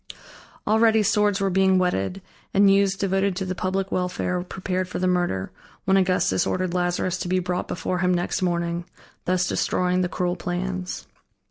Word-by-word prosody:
Already 220 0 +4
swords 210 -1 +2
were 195 -1 0
being 190 0 +4
whetted 180 - -1 0.3
and 200 0 +6
youths 195 -1 +3
devoted 195 0 0
to 190 +1 -3
the 185 - -2
public 190 +2 -2
welfare 180 0 -1
prepared 185 0 -3
for - - -4
the 185 - 0
murder, 175 - 0 0.3
when 190 - +3
Augustus 185 - +2
ordered 185 -1 -1
Lazarus 180 0 0
to - - -3
be 185 +1 +1
brought 180 0 -2
before 180 +1 -2
him 180 0 +2
next 175 +3 -1
morning, 170 -1 -1 0.4
thus 180 0 +1
destroying 180 0 +1
the 180 - 0
cruel 180 0 -1
plans. 185 +1 -4
185 Hz, 165 wpm, -24 LUFS, 180-190 Hz, 0.4 s, and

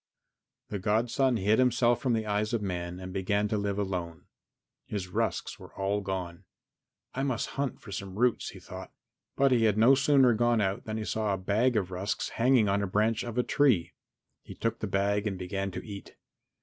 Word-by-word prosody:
XII 105 - -1
The - - -7
godson 115 +6 +1
hid 105 +3 +2
himself 120 -1 +3
from 130 -4 +1
the 110 -1 0
eyes 105 +2 -1
of 115 - -1
men 90 -2 -4
and 95 0 -7
began 100 +2 0
to 110 - 0
live 100 -1 -1
alone. 90 -5 -3 0.6
His 95 -3 -4
rusks - - -2
were - - -13
all 100 +1 -1
gone. 95 -2 -5 0.7
"I 135 - -2
must 135 -3 -1
hunt 140 -1 -3
for 105 - -11
some 95 0 -6
roots," 125 +1 +1
he - - -11
thought, - - -9 0.4
but 135 -1 +3
he 120 -3 +4
had 105 -1 +2
no 115 +5 +6
sooner 135 -2 +5
gone 120 +1 +2
out 95 -1 -1
than 110 0 -3
he 110 - -3
saw 105 -2 0
a - - -5
bag 110 +6 +1
of 95 -3 -1
rusks 95 +3 -2
hanging 120 -2 +3
on 100 +1 +2
the 100 - -1
branch 110 +3 +1
of 120 0 -6
a 125 - +3
tree. 120 - +2 0.5
He - - -11
took 115 0 -2
the 110 - -3
bag 100 +2 0
and 95 -3 -3
began 95 +1 -3
to 90 - -7
eat. 100 -2 -9
105 Hz, 205 wpm, -29 LUFS, 95-120 Hz, 0.7 s, no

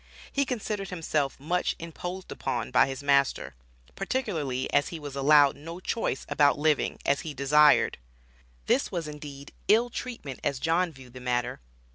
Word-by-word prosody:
He 280 0 +1
considered 210 -6 -3
himself 155 -6 -1
much 175 +6 0
"imposed 175 +3 -7
upon" - - -3
by 125 - +5
his 135 +1 -6
master, 140 - +2 0.4
particularly 170 - -2
as 145 - +3
he 165 - -6
was 145 -2 -7
allowed 145 0 +5
"no 165 +4 -8
choice 185 - -2
about 145 0 +3
living" 150 0 +1
as 140 - +2
he 155 -4 -6
"desired." 145 - +4 0.7
This - - +1
was 170 -3 -3
indeed 145 -2 -9
ill 235 +3 +4
treatment 225 - -6
as 140 -2 0
John 165 +5 +1
viewed 130 -4 -14
the 130 - -9
matter. 125 -1 -1
150 Hz, 155 wpm, -28 LUFS, 140-180 Hz, 0.7 s, by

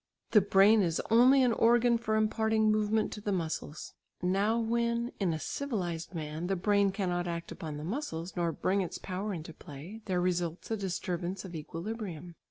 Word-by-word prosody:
The 210 - +7
brain 200 +3 +5
is 170 -4 0
only 255 +4 +6
an 245 -2 +3
organ 235 +1 +4
for 220 -2 -1
imparting 220 0 +2
movement 215 0 +1
to 210 - -7
the 205 - -2
muscles. 160 -4 -4 0.3
Now 200 +5 +2
when 235 +1 0
in 190 -4 +1
a 160 - -1
civilised 180 - -3
man 155 +1 -4
the 195 - +1
brain 200 +1 +2
cannot 180 -3 -1
act 170 -1 -4
upon 155 -2 -6
the 150 - -6
muscles, 185 - -4
nor 170 -2 0
bring 190 +5 0
its 180 - -4
power 195 +3 -4
into 165 -3 -6
play, 155 +11 -10
there 185 -3 0
results 175 +1 -1
a - - +2
disturbance 185 -1 -3
of 180 - -8
equilibrium. 170 +1 -6
195 Hz, 180 wpm, -31 LUFS, 170-220 Hz, 0.3 s, The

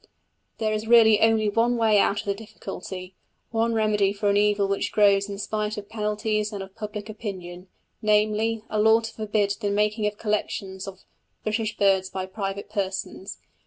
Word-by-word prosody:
There 215 -1 0
is 215 +1 -3
really 225 -2 +6
only 225 -1 +4
one 230 +3 +2
way 220 -3 +4
out 200 +1 +2
of - - -16
the 200 - 0
difficulty, 190 -3 -8 0.4
one 230 0 +1
remedy 210 -2 +2
for 205 0 +1
an - - +1
evil 205 -1 +3
which 200 0 -1
grows 200 -1 +4
in 200 - -5
spite 210 +1 -2
of 205 0 -7
penalties 215 0 -1
and 200 -2 -5
of 190 0 -12
public 210 -1 -6
opinion, 190 -4 -7 0.3
namely, 215 +1 +2
a 215 - -2
law 220 +1 +5
to 225 - -6
forbid 210 -2 0
the 205 -3 -1
making 210 +1 +1
of 210 0 -4
collections 200 -3 -3
of 190 -1 -9 0.4
British 215 0 -2
birds 190 -2 +3
by 190 -1 -4
private 195 +1 -5
persons. 190 -1 -4
210 Hz, 175 wpm, -25 LUFS, 200-220 Hz, 0.4 s, really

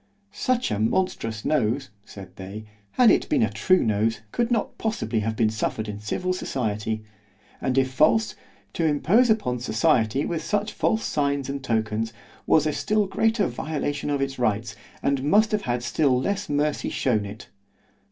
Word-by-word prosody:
Such 255 - 0
a 105 - -1
monstrous 115 -3 -1
nose, 135 -3 0
said 95 -4 -11
they, 100 +3 -8 0.3
had 245 -3 +6
it - - +2
been 285 -6 +3
a - - +1
true 185 0 +3
nose, 110 +1 0
could 235 -1 0
not 235 -3 -1
possibly 125 - -1
have 110 +1 -2
been 110 -1 +2
suffered 110 0 -2
in 105 -1 -5
civil 180 +13 -2
society——and 110 - -4
if 130 -1 +2
false—to 165 +2 0
impose 165 - +3
upon 165 - +1
society 120 +1 +1
with 165 -2 -3
such 205 +4 -1
false 220 0 0
signs 140 -2 0
and 140 -1 -4
tokens, 110 -2 -1 0.3
was 155 -1 +4
a 155 - 0
still 215 +5 +1
greater 220 +2 +1
violation 145 -2 -3
of 140 -1 0
its 135 -1 -2
rights, 110 -1 0 0.3
and 140 -1 +1
must 210 +9 +4
have 210 -1 +1
had 120 0 0
still 130 0 +2
less 200 +8 -2
mercy 145 +1 0
shewn 110 -5 0
it. 100 +2 -9
135 Hz, 160 wpm, -25 LUFS, 110-180 Hz, 0.3 s, had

